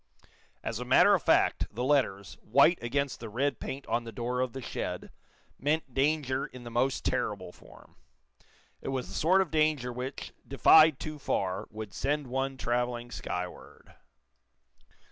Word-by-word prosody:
As - - -3
a - - -3
matter - - +5
of - - +3
fact, - - +3
the 120 +4 -4
letters, 125 -9 +1
white 140 +9 +4
against 140 +3 -1
the 115 - -7
red 135 +6 -1
paint 135 +1 -6
on 120 - -1
the 115 - -8
door 120 +3 -3
of 130 -2 -1
the 135 - -5
shed, - - -5 0.5
meant 145 -1 -1
danger 135 -1 +1
in 125 -1 -12
the 120 - -8
most 130 +3 0
terrible - - -1
form. - - -18 0.9
It - - -8
was 130 -2 -3
the - - -9
sort 185 +5 +3
of 185 - -2
danger, 155 -6 +1
which, 125 +3 -6
defied 155 +2 +6
too 155 -1 -6
far, 95 -7 -2
would 110 -2 -8
send 145 +1 -1
one 135 +1 -2
traveling 120 -1 -2
skyward. 90 -5 -7
130 Hz, 160 wpm, -29 LUFS, 120-145 Hz, 0.9 s, defied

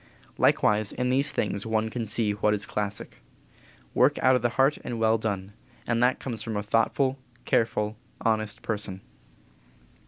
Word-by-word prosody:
Likewise 105 0 +3
in 125 0 -1
these 140 +3 +3
things 100 -4 -1
one 110 0 0
can 115 -2 -3
see 105 0 +1
what 105 +1 +1
is 100 - -3
classic 105 0 -4 0.8
work - - +4
out 130 +1 +6
of 125 - +1
the 120 - +2
heart 135 +3 +3
and 120 - -4
well 110 0 +3
done, 100 -2 -3 0.3
and 115 0 0
that 125 +1 +3
comes 115 -5 -4
from 110 -2 -3
a 105 - -2
thoughtful, 130 +5 +1 0.3
careful, 110 -2 +1 0.3
honest 110 -2 0
person. 105 -3 -3
110 Hz, 160 wpm, -27 LUFS, 105-120 Hz, 0.8 s, out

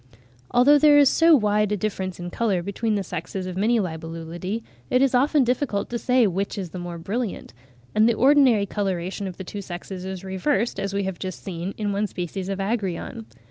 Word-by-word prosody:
Although 275 +5 +5
there 295 0 +6
is 285 -2 +7
so 330 +1 +6
wide 210 -3 +2
a 210 - +1
difference 190 -2 -3
in 175 0 -6
colour 195 -6 0
between 210 +3 -1
the 200 - -1
sexes 180 +2 -5
of 185 -1 -5
many 225 +5 +2
Libellulidae, 165 +4 -4 0.3
it 250 - +3
is 270 -1 +3
often 280 +3 +4
difficult 245 -4 -1
to 235 - -2
say 250 -1 +3
which 195 +1 -2
is 185 -5 -5
the 180 - -6
more 175 -1 -6
brilliant; 205 - -4 0.4
and 215 +2 +4
the 235 - +2
ordinary 260 -5 +5
coloration 195 -1 -3
of 180 - -7
the 190 - -6
two 200 +2 -6
sexes 180 0 -7
is 190 0 -6
reversed, 195 +4 -1
as 195 0 -2
we 200 0 -1
have 190 -2 -4
just 185 -2 -6
seen, 180 +1 -5
in 205 -2 -1
one 205 +1 0
species 185 +1 -5
of 195 - -2
Agrion. 200 +1 -3
200 Hz, 205 wpm, -24 LUFS, 185-235 Hz, 0.4 s, is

